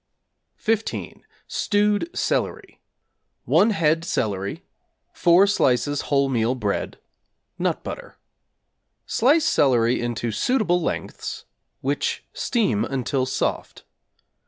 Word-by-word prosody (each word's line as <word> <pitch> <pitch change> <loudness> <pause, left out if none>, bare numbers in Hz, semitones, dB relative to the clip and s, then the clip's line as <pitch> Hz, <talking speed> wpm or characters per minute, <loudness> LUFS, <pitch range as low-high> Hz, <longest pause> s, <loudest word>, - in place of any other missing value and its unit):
=15. 225 0 -2 0.3
Stewed 210 +7 +1
Celery= 410 -4 -2 0.6
1 215 - +4
head 165 -5 +2
celery, 100 - -2 0.5
4 175 +3 +5
slices 145 - +1
whole 140 -1 +3
meal 120 -1 +1
bread, 105 -5 -2 0.6
nut - - -1
butter. - - -8 0.9
Slice 295 +7 +3
celery 120 -4 +3
into 120 -1 -2
suitable 180 - +1
lengths, - - -4 0.4
which - - -2
steam 205 - 0
until 130 0 -1
soft. 130 - -3
145 Hz, 90 wpm, -23 LUFS, -, 0.9 s, 4